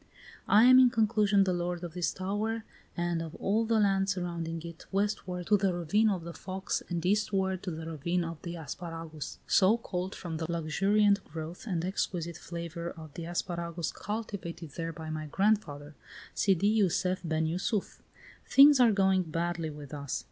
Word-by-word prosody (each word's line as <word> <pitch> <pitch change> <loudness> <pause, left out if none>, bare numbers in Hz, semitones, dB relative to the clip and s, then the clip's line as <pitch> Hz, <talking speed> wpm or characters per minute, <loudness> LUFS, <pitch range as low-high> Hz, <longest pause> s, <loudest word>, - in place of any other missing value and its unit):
"I 210 +2 +6
am, 255 +1 +8
in 255 -1 +7
conclusion, 215 -3 +3
the 185 -1 +1
lord 175 0 -2
of 170 -2 -6
this 175 -1 0
tower 210 +4 -2 0.3
and 175 -1 0
of 165 -1 -6
all 220 +3 +1
the 225 0 +2
land 195 -1 +2
surrounding 170 -3 -3
it, 170 -1 -10
westward 195 -3 -1
to 205 +2 +4
the 190 -2 +1
ravine 205 +6 +2
of 185 -5 -1
the 170 0 -7
Fox 190 +2 -3
and 170 -1 -2
eastward 190 -2 +1
to 190 - -4
the 160 -1 -5
ravine 170 +3 -1
of 165 -2 -6
the 170 0 -5
Asparagus, 165 -1 -7
so 205 +4 +4
called 185 -4 -4
from 165 -3 -5
the 160 +1 -3
luxuriant 195 +5 +2
growth 160 +6 -8
and 175 -4 -1
exquisite 175 -3 -2
flavor 170 0 -6
of 160 -4 -10
the 170 - -6
asparagus 170 -1 -3
cultivated 190 -7 -5
there 165 +3 -4
by 160 0 -7
my 155 -1 -4
grandfather, 155 -6 0 0.4
Sidi 200 +3 +3
Jussef 185 0 +1
ben 160 -1 0
Jussuf. 185 +5 -2 0.5
"Things 280 0 +8
are 240 -3 +6
going 190 -2 +3
badly 170 -1 -2
with 145 -1 -9
us. 140 -2 -3
180 Hz, 170 wpm, -30 LUFS, 165-200 Hz, 0.5 s, am